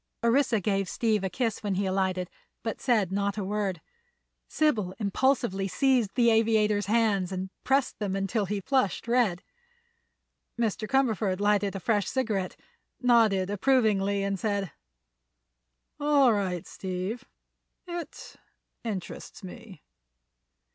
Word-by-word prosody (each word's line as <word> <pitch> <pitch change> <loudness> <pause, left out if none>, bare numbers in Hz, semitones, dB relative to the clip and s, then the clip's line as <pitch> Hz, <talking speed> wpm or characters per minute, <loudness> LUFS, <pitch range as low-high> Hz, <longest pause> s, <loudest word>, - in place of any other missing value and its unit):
Orissa 235 -1 +3
gave 195 -1 0
Steve 215 -4 0
a 190 - 0
kiss 230 0 -2
when 205 -3 -1
he 195 +1 0
alighted, 185 -1 0 0.4
but 225 - -4
said 215 -8 +2
not 200 +1 -1
a 205 - -2
word. 195 -3 -2 0.7
Sybil 215 -12 0
impulsively 205 -2 +1
seized 250 -1 +1
the 235 -2 +4
aviator's 215 -2 +2
hands 210 -4 +2
and 185 0 -4
pressed 270 0 +1
them 200 -3 -2
until 195 +1 -1
he 205 +1 -2
flushed 235 -3 0
red. 230 -7 +2 1.2
Mr. 220 -1 -1
Cumberford 220 -8 +1
lighted 205 -1 +1
a - - -3
fresh 205 -1 0
cigarette, 215 -8 -2 0.4
nodded 220 -6 +3
approvingly 205 -3 +2
and 195 -1 -1
said: 200 -5 -1 1.3
"All 285 -4 +4
right, 185 -4 -2
Steve. 190 +7 -5 0.6
It—interests 270 - -8
me." 180 - -11
205 Hz, 120 wpm, -28 LUFS, 195-235 Hz, 1.3 s, the